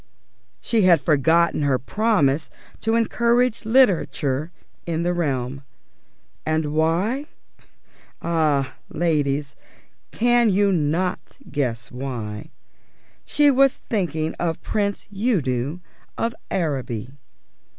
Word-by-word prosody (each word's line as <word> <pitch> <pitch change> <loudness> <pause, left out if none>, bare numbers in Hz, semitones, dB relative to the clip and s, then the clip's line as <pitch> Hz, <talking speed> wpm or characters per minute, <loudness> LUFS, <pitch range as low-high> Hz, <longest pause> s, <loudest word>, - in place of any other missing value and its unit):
She 230 -2 +1
had 180 -4 +6
forgotten 160 +3 +2
her 140 -3 +2
promise 160 - +1 0.3
to 225 +1 0
encourage 235 +1 +1
literature 175 - +2 0.4
in 165 0 -1
the 175 +1 +1
realm. 135 -5 -2 0.8
And 155 -1 -1
why? 180 - +1 0.9
Ah, 155 -5 +1 0.2
ladies, 145 -4 0 0.6
can 240 0 +3
you 200 +1 +3
not 175 +2 -1
guess 125 -4 -2
why? 120 -5 -5 0.8
She 295 -1 +4
was 275 0 +4
thinking 165 -7 -2
of 165 -2 -1
Prince 200 -1 -2
Udo 160 - 0 0.4
of 230 0 -1 0.2
Araby. 130 - -2
165 Hz, 95 wpm, -22 LUFS, 140-210 Hz, 0.9 s, had